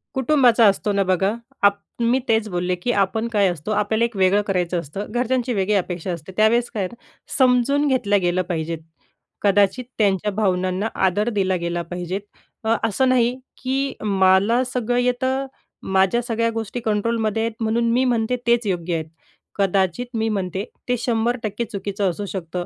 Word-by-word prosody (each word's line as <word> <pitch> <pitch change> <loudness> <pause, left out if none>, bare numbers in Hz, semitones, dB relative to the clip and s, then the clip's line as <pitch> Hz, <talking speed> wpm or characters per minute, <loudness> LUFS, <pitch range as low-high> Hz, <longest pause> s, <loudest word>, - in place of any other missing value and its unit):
कुटुंबाचा 255 -4 +4
असतो 205 +1 +2
ना. 200 0 +2
बघा, 190 +2 +1 0.3
आप 200 0 +4 0.2
मी 235 +3 +3
तेच 220 -1 +2
बोलले, 180 0 -1
की 180 +8 -2
आपण 220 +4 -2
काय 205 -2 +4
असतो, 175 +3 -4
आपल्याला 215 +2 +1
एक 235 -2 -6
वेगळं 190 +2 +4
करायचं 180 -2 0
असतं, 170 +7 -6
घरच्यांची 245 +1 0
वेगळी 200 0 0
अपेक्षा 180 -1 -2
असते. 170 +1 -7
त्या 215 0 +6
वेळेस 240 +2 +1
काय 205 - -2
आहे, 185 +6 -5 0.4
समजून 260 +2 +3
घेतल्या 245 -7 +2
गेल्या 180 +1 +1
पाहिजेत, 165 -2 -3 0.6
कदाचित 205 +4 +2
त्यांच्या 205 -1 +1
भावनांना 185 -1 0 0.2
आदर 205 +5 +1
दिला 195 -4 0
गेला 170 0 -2
पाहिजेत. 180 +2 -3 0.4
अ, 220 +1 +2
असं 260 +5 +1
नाही, 245 -1 +3 0.3
की 270 +1 -1
मला 200 +4 +3
सगळं 245 -1 0
येतं, 260 +2 0 0.4
माझ्या 190 +5 +2
सगळ्या 230 -1 0
गोष्टी 225 +1 -4
कंट्रोलमध्ये 220 0 0
आहेत 230 0 -2
म्हणून 230 +1 +1
मी 250 +2 +3
म्हणते 240 -1 +1
तेच 235 0 +3
योग्य 175 -2 -1
आहे. 160 - -2 0.5
कदाचित 195 +2 +1
मी 225 0 0
म्हणते 190 -2 -2 0.3
ते 245 - +2
100% 230 -1 -1
चुकीचं 200 -1 -2
असू 205 +4 -4
शकतं, 180 -2 -5
210 Hz, 165 wpm, -22 LUFS, 190-235 Hz, 0.6 s, त्या